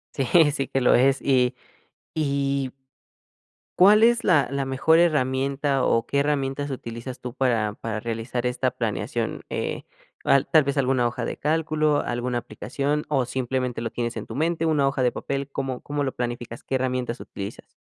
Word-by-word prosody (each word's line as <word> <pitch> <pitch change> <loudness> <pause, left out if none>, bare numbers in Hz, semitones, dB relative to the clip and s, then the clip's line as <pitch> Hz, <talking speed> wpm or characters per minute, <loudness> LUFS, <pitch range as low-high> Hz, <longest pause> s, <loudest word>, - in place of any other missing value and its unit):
Sí 135 - 0 0.3
sí 140 -2 -2
que 135 - 0
lo 125 - +5
es, 135 +2 +4
y 130 -2 +3 0.6
y 140 -3 0 1.1
¿cuál 210 +4 +7
es 235 0 +4
la 155 -9 +3
la 140 -1 -1
mejor 135 +5 +3
herramienta 135 -3 +1
o 115 0 +2
qué 140 - 0
herramientas 140 -1 -1
utilizas 125 0 -6
tú 125 -1 -7
para 115 -6 +1
para 110 -1 -4
realizar 115 +2 -3
esta 125 +1 0
planeación?, 115 -5 -3
eh, - - -3 0.4
al 140 - +3
tal 155 -2 +5
vez 140 +1 -2
alguna 130 -2 +2
hoja 120 0 -4
de - - -4
cálculo, 155 -1 +1
alguna 120 0 -2
aplicación 135 +6 -2
o 135 -4 +1
simplemente 125 -1 -2
lo 115 - -2
tienes 120 0 -3
en - - -5
tu - - -7
mente, 165 +2 0
una 145 -3 +2
hoja 135 -1 -1
de 125 -1 +3
papel, 140 0 -4
¿cómo 135 -2 -3
cómo 145 0 -2
lo 135 - -2
planificas?, 120 -1 -5
¿qué 135 - -2
herramientas 125 -2 -1
utilizas? 100 +2 -8
135 Hz, 170 wpm, -24 LUFS, 125-145 Hz, 1.1 s, cuál